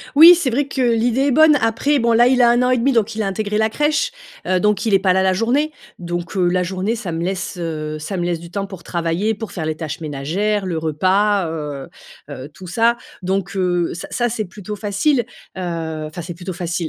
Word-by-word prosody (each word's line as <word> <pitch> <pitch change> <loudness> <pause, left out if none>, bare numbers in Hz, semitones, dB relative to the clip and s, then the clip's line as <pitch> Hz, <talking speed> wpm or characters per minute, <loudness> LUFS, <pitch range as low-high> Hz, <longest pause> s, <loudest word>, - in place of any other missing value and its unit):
Oui, 330 +4 +10
c'est 320 -6 0
vrai 275 +4 0
que 275 -1 -4
l'idée 240 +2 +2
est 285 - +3
bonne. 310 +2 +6
Après 230 +6 +1
bon, 235 -1 +2
là, 235 +1 +5
il 255 -1 +2
a 235 - +6
1 240 +1 +3
an 250 - +2
et 255 - +3
demi 270 +4 +2
donc 225 -2 +1
il 220 - -2
a - - -1
intégré 210 +2 -2
la 220 0 +3
crèche. 305 - +1 0.4
Heu, 185 -1 +1
donc 210 +1 +1
il 210 - +3
est 195 - +6
pas 190 -1 +2
là 190 0 +2
la 190 - +3
journée, 260 +10 +1 0.3
donc, 175 +2 -5
heu, 180 -2 +3
la 180 +1 +1
journée 190 +5 -2
ça 195 -7 -5
me 165 +1 -3
laisse, 190 0 -3
heu, 155 -2 -4
ça 170 +6 -5
me 175 - -1
laisse 175 -2 -1
du 170 0 -11
temps 195 +2 -3
pour 190 -3 -10
travailler, 170 +6 -1
pour 220 +1 -7
faire 160 -4 -4
les 155 - -2
tâches 155 +1 -5
ménagères, 175 +8 -2
le 170 -3 -2
repas 185 +5 +1
heu, 150 -4 -5 0.4
heu, 130 +3 -7
tout 185 - -11
ça. 230 +6 +2 0.3
Donc, 195 +1 -2
heu, 175 -2 0
ça 175 - -7
ça, 240 -1 0
c'est 220 -1 -3
plutôt 205 +2 -8
facile, 205 +8 +1 0.4
heu, 165 -3 -4
enfin, 160 +3 -7
c'est 175 +1 -7
plutôt 180 +2 -6
facile 175 -1 -3
195 Hz, 240 wpm, -19 LUFS, 170-230 Hz, 0.4 s, Oui